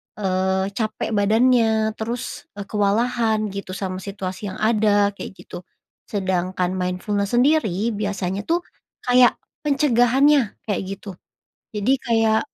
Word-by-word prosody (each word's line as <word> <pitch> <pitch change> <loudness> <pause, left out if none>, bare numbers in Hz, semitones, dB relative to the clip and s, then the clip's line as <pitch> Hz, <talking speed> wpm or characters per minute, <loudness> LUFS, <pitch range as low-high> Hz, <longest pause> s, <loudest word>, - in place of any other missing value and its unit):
eee, 190 -1 0
capek 215 +1 -3
badannya 220 +1 +3
terus, 230 +2 -5
eee, 200 - -5
kewalahan 215 +1 0
gitu 200 -1 -6
sama 185 -1 -4
situasi 195 0 -6
yang 190 - -6
ada 210 -2 +3
kayak 200 -1 -9
gitu, - - -8 0.5
sedangkan 185 -2 -1
mindfulness 190 +3 -2
sendiri 240 - +2
biasanya 200 -2 -3
tuh, 345 +1 +1 0.4
kayak 245 -1 +5 0.3
pencegahannya 270 -2 +3
kayak 205 -4 -2
gitu, 195 +1 -7 0.6
jadi 210 +3 0
kayak 225 -2 +2
210 Hz, 115 wpm, -22 LUFS, 195-235 Hz, 0.6 s, kayak